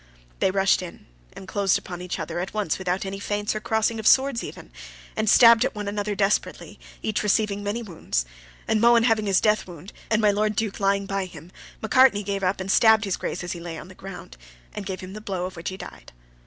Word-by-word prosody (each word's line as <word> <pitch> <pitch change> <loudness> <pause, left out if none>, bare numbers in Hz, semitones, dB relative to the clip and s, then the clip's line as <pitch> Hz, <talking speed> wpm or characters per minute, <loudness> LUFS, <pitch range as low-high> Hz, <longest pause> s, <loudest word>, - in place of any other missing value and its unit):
They - - +3
rushed 195 0 +2
in, 180 -2 -10 0.3
and 190 - -11
closed 195 -1 +1
upon 175 -1 -8
each 180 -1 -4
other 170 +1 -4
at 185 +4 -5
once 205 -6 -1
without 185 +1 -2
any 195 +1 -5
feints 205 0 -2
or 215 - -3
crossing 220 +1 0
of 220 - -1
swords 265 -3 +4
even, - - -9 0.4
and 215 -1 0
stabbed 230 0 +7
one 205 -1 -5
at 200 - -3
the 205 - -1
other 205 0 -3
desperately, 200 +1 -1 0.2
each 215 - -1
receiving 210 -1 +1
many 210 +4 -3
wounds; 160 - -3 0.4
and 215 -1 +1
Mohun 235 0 +5
having 225 -3 +2
his 195 -2 +4
death 210 -3 +1
wound, 175 +2 -11 0.2
and 215 - +2
my 210 -2 +4
Lord 210 +1 0
Duke 215 -1 -2
lying 200 0 +1
by 195 -1 -2
him, 175 -1 -12 0.3
Macartney 220 -2 +4
came 200 0 -3
up 185 +1 0
and 190 +1 -2
stabbed 220 0 +5
his 195 - -1
Grace - - -4
as 175 - -4
he 175 - -5
lay 170 -1 -7
on 180 - -10
the - - -12
ground, 185 -2 -10 0.4
and 200 -2 -6
gave 190 -1 -5
him 185 +1 -9
the 215 - -8
blow 190 -4 -3
of 185 - -7
which 165 0 -5
he 190 - -7
died. - - -11
200 Hz, 235 wpm, -24 LUFS, 185-215 Hz, 0.4 s, stabbed